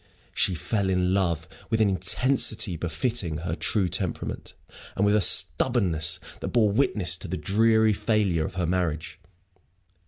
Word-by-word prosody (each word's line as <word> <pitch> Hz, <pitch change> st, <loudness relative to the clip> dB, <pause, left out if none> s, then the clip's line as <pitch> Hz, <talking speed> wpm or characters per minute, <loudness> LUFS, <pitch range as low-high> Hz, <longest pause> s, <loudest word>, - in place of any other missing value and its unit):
She 95 Hz, -, 0 dB
fell 100 Hz, +4 st, -2 dB
in 90 Hz, 0 st, +1 dB
love 85 Hz, -4 st, -1 dB, 0.2 s
with 110 Hz, -, 0 dB
an 110 Hz, -, +3 dB
intensity 100 Hz, +1 st, +2 dB
befitting 85 Hz, -, -2 dB
her 85 Hz, 0 st, -4 dB
true 100 Hz, 0 st, 0 dB
temperament, 85 Hz, -, -4 dB, 0.4 s
and 100 Hz, -, +1 dB
with 105 Hz, +1 st, +3 dB
a 105 Hz, -, +3 dB
stubbornness 85 Hz, -, +2 dB, 0.2 s
that -, -, -5 dB
bore 110 Hz, -4 st, +2 dB
witness 100 Hz, -7 st, +1 dB
to 95 Hz, -, -9 dB
the 90 Hz, +2 st, -4 dB
dreary 110 Hz, +2 st, +2 dB
failure 100 Hz, -6 st, 0 dB
of -, -, -11 dB
her 90 Hz, -2 st, -1 dB
marriage. 80 Hz, -3 st, -3 dB
95 Hz, 150 wpm, -25 LUFS, 85-110 Hz, 0.4 s, an